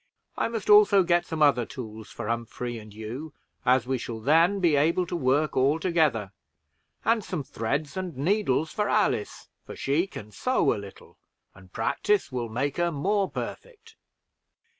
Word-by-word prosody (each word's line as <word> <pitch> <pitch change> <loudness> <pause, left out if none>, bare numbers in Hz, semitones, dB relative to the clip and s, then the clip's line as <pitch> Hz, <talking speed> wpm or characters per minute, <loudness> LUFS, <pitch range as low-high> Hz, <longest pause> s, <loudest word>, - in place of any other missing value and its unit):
I - - 0
must 230 -3 -5
also 205 -2 +7
get 175 0 +2
some 160 -2 0
other 140 -5 +4
tools 110 -3 -8
for - - -7
Humphrey 115 +1 -3
and 105 -1 -13
you, 115 +9 -7 0.3
as 125 -1 +4
we 130 0 -1
shall 115 -1 -6
then 165 - +3
be 170 -5 +3
able 165 +5 +2
to 175 - -4
work 145 0 +1
all 140 +5 +3
together; 155 - +1 0.7
and 225 -1 +2
some 175 -7 -4
threads 140 +5 -3
and 185 -6 -5
needles 160 -2 +1
for 210 -1 -1
Alice, 210 - 0 0.2
for - - -9
she 150 +7 0
can 105 - -10
sew 250 - +1
a - - -4
little, 100 -1 -13 0.3
and 95 -1 -17
practice 180 - 0
will 120 -2 -3
make 130 +5 -2
her 175 0 +1
more 195 +6 0
perfect." 460 -2 -8
150 Hz, 165 wpm, -26 LUFS, 120-185 Hz, 0.7 s, also